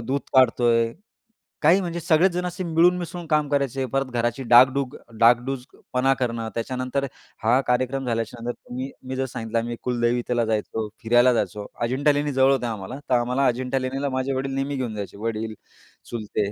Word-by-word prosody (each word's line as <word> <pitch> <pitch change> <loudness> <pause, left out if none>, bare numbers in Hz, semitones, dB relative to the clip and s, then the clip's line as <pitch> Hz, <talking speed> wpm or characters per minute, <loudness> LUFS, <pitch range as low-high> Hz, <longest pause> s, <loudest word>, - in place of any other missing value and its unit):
दूध 135 +4 -1
काढतो 125 -2 +4
आहे. 115 0 +2 0.7
काही 170 +6 +5
म्हणजे 170 -1 -3
सगळेच 170 +3 +3
जणं 180 +1 -2
असे 180 +1 -5
मिळून 170 +2 +3
मिसळून 175 0 -6
काम 150 -1 +2
करायचे. 135 -2 0
परत 135 +2 -1
घराची 120 +2 -1
डागडुग 130 +3 +5 0.2
डागडुगपणा 125 +2 +2
करणं, 115 -2 -2
त्याच्यानंतर 130 +3 -2 0.4
हा 120 +4 +4
कार्यक्रम 130 +2 0
झाल्याच्यानंतर 115 +1 -3
तुम्ही 130 +2 -7 0.2
मी 130 - -3
जर 135 0 -1
सांगितलं, 115 -2 -3
आम्ही 120 +1 -3
कुलदेवतेला 120 -1 0
जायचो. 110 0 -2 0.2
फिरायला 120 +2 +5
जायचो. 105 -2 -2 0.2
अजिंठा 130 +5 +2
लेणी 145 0 -1
जवळ 130 +1 +4
होत्या 125 -3 0
आम्हाला, 110 +6 -6
तर - - +2
आम्हाला 125 +3 +1
अजिंठा 125 +2 0
लेणीला 135 +2 -2
माझे 130 +1 -1
वडील 135 +1 -2
नेहमी 135 +1 -2
घेऊन 120 -4 -3
जायचे. 100 -1 -6
वडील 110 0 -3 0.6
चुलते, 105 -3 -2
125 Hz, 165 wpm, -24 LUFS, 115-135 Hz, 0.7 s, काही